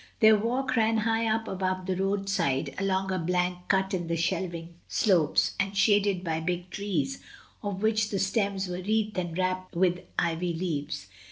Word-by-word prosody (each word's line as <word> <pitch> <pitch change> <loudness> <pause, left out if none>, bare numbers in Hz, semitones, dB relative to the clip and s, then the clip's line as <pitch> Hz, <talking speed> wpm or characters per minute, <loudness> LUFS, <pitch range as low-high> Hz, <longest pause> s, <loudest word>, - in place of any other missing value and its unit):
Their 220 0 +7
walk 245 +5 0
ran 225 0 +3
high 225 +1 +1
up 225 +1 0
above 185 -1 -2
the 190 0 -1
roadside, 195 -7 0
along 190 -1 0
a 185 - 0
bank 180 +1 0
cut 190 0 +1
in 175 -2 -1
the 170 - 0
shelving 170 0 -2
slopes, 180 -9 +2
and 200 0 -1
shaded 200 -3 +3
by 160 -2 -1
big 175 +2 -3
trees, 205 +7 -2 0.4
of 205 -1 -4
which 215 -1 +2
the 200 - -1
stems 195 -1 0
were 180 0 -4
wreathed 215 0 0
and 175 -2 -4
wrapped 185 0 -1
with 180 0 +2 0.2
ivy 170 +1 0
leaves. 150 - -3
190 Hz, 170 wpm, -28 LUFS, 180-205 Hz, 0.4 s, Their